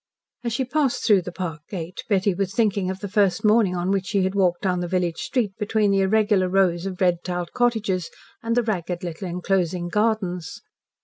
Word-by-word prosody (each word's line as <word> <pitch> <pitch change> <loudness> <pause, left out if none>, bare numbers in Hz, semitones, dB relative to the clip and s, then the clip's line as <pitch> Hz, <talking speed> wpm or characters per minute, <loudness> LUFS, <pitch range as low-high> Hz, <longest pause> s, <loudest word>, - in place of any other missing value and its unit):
As 235 - -2
she 260 +3 0
passed 275 0 0
through 205 -4 +5
the 180 - -7
park 170 -3 -5
gate 175 -2 -6
Betty 200 -1 +2
was 195 +3 -3
thinking 205 -5 +1
of 190 0 -5
the 205 - -3
first 200 -1 +1
morning 210 -4 +4
on 175 +2 -1
which 195 -1 0
she 200 -2 +1
had 190 +1 0
walked 180 -2 +1
down 180 -2 +1
the 175 - -2
village 175 -2 -1
street 230 -7 -1
between 210 -1 +1
the 195 - +3
irregular 200 -1 +2
rows 185 -1 +2
of 185 -2 -6
red 175 -2 +2
tiled 175 -1 -4
cottages 215 -7 0 0.3
with 230 0 -1
the 245 - +3
ragged 180 -4 -3
little 175 +2 -5
enclosing 180 -1 -1
gardens. 200 -4 -1
190 Hz, 200 wpm, -23 LUFS, 180-210 Hz, 0.3 s, through